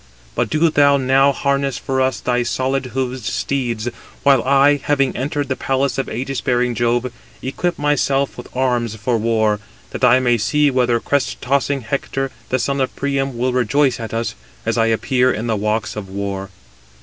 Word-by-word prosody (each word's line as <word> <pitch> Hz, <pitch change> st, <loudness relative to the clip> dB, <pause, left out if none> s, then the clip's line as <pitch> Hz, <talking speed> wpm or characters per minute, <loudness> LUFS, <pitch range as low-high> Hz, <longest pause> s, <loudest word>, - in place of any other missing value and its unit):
But -, -, -1 dB
do 160 Hz, +1 st, +2 dB
thou 140 Hz, -1 st, +5 dB
now 135 Hz, +1 st, +4 dB
harness 140 Hz, -1 st, 0 dB
for 130 Hz, 0 st, -1 dB
us 130 Hz, -2 st, +1 dB
thy 125 Hz, -1 st, 0 dB
solid 130 Hz, +2 st, -1 dB
hoofed 130 Hz, -1 st, -2 dB
steeds, 120 Hz, -2 st, -2 dB, 0.4 s
while 135 Hz, -3 st, +5 dB
I, 140 Hz, +3 st, +4 dB
having 140 Hz, -2 st, +1 dB
entered 145 Hz, +2 st, -2 dB
the 130 Hz, -, -1 dB
palace 135 Hz, +1 st, 0 dB
of 135 Hz, -, -2 dB
ægis 130 Hz, +2 st, -4 dB
bearing 125 Hz, -1 st, +1 dB
Jove, 120 Hz, +1 st, 0 dB, 0.3 s
equip 175 Hz, +7 st, -2 dB
myself 140 Hz, -1 st, +1 dB
with -, -, -9 dB
arms 120 Hz, -4 st, 0 dB
for 115 Hz, +2 st, -1 dB
war, 110 Hz, -2 st, +1 dB, 0.3 s
that -, -, -6 dB
I 125 Hz, +2 st, +6 dB
may 120 Hz, -2 st, +2 dB
see 145 Hz, +8 st, +2 dB
whether 125 Hz, -2 st, +2 dB
crest 140 Hz, +3 st, -1 dB
tossing 140 Hz, +1 st, 0 dB
Hector, 135 Hz, +2 st, -3 dB, 0.2 s
the 130 Hz, -, +2 dB
son 140 Hz, +2 st, -1 dB
of 130 Hz, -, -2 dB
Priam, 135 Hz, -2 st, -1 dB
will 125 Hz, +1 st, 0 dB
rejoice 130 Hz, +1 st, +2 dB
at 115 Hz, -1 st, -5 dB
us, 115 Hz, +1 st, -2 dB, 0.3 s
as -, -, 0 dB
I 115 Hz, -1 st, +2 dB
appear 125 Hz, +3 st, +2 dB
in 110 Hz, -, -3 dB
the 115 Hz, -2 st, 0 dB
walks 105 Hz, 0 st, -1 dB
283 105 Hz, -, -4 dB
of 95 Hz, 0 st, -10 dB
war. 95 Hz, -1 st, -5 dB
130 Hz, 185 wpm, -19 LUFS, 120-140 Hz, 0.4 s, I